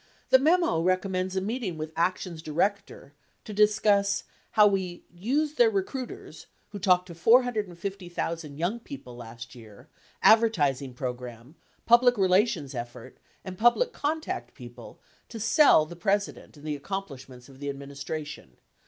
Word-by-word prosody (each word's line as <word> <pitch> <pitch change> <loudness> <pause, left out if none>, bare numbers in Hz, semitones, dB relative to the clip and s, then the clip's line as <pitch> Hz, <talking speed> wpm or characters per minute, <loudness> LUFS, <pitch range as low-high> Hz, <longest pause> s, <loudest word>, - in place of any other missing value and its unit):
The 260 - +8
memo 335 - +2
recommends 185 +1 -1
a 190 - 0
meeting 210 -4 -3
with 155 0 -6
ACTION'S 170 -1 -1
Director 170 -2 -2 0.3
to 215 - -7
discuss 205 -1 +2 0.3
how 210 - +6
"we 190 -3 -1
used 280 - -1
their 480 -2 +6
recruiters 380 - -5 0.2
(who 205 - -7
talked 180 -2 +3
to 175 - -10
450,000 180 - 0
young 180 +9 -1
people 235 - -10
last 115 0 -10
year), 110 -5 -15 0.3
advertising 145 - +3
program, 125 0 -7 0.3
public 245 +1 +5
relations 185 - +2
effort, 120 -1 -8 0.3
and 185 -1 -8
public 455 - +3
contact 315 +2 -3
people, - - -12 0.3
to 225 - -8
sell 225 - +5
the 175 +3 -10
President 200 -2 -2
and 145 - -14
the 150 -1 -2
accomplishments 140 -7 -7
of 135 -1 -16
the 145 0 -4
administration. 140 - -7
185 Hz, 135 wpm, -27 LUFS, 145-220 Hz, 0.3 s, The